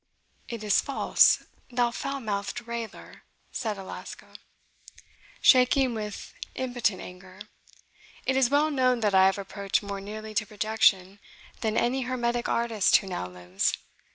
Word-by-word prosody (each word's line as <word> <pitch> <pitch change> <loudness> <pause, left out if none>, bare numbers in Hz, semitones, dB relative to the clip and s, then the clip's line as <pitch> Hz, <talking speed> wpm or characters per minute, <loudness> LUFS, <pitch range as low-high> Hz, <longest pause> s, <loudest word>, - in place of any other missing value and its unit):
"It 230 -2 -6
is 210 -1 +3
false, 275 - +3 0.3
thou 245 -1 +1
foul 275 +3 -4
mouthed 205 +2 -3
railer," 235 -1 -7 0.3
said 220 -5 -3
Alasco, 190 -1 -9 1.1
shaking 255 0 +5
with 210 -2 -6 0.2
impotent 245 -6 -1
anger; 185 +1 -12 0.9
"it 265 - +1
is 265 -2 +3
well 295 +2 +3
known 255 -3 +2
that 210 -2 +1
I 190 0 +6
have 195 - +1
approached 200 0 -2
more 200 -1 -5
nearly 215 +2 -7
to 215 0 0
projection 205 -2 +1 0.4
than 220 -1 -1
any 260 +3 +1
hermetic 240 -1 -1
artist 230 -4 +2
who - - +4
now 180 - -4
lives. 90 +1 -2
220 Hz, 135 wpm, -27 LUFS, 200-245 Hz, 1.1 s, I